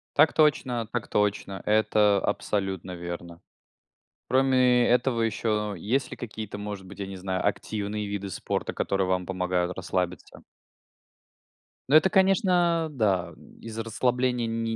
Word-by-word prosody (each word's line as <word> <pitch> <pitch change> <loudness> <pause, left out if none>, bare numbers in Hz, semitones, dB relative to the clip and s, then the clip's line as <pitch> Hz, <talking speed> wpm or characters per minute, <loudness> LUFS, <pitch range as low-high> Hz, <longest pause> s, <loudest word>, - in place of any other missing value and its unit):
Так 150 +2 +5
точно, 130 -7 +2
так 120 -3 -2
точно, 100 -2 -1
это 105 -1 +3
абсолютно 95 -3 -2
верно. 85 0 -7 0.9
Кроме 130 -2 +4
этого, 125 -1 +2
еще 105 -2 -1
есть 130 +9 -1
ли - - -7
какие-то, 110 -3 -7
может 105 -2 -6
быть, 100 - -12
я 100 - -4
не 95 0 -7
знаю, 95 +1 -2
активные 105 0 -2
виды 100 -1 -4
спорта, - - -3
которые 95 -1 0
вам 90 -1 0
помогают 90 -1 -1
расслабиться? 90 -1 -3 1.5
Но 145 - +3
это, 175 +5 +6
конечно, 180 -4 +3
да, 100 -9 0 0.3
из 115 -1 -8
расслабления 125 +1 0
не 115 0 -2
105 Hz, 130 wpm, -26 LUFS, 95-125 Hz, 1.5 s, это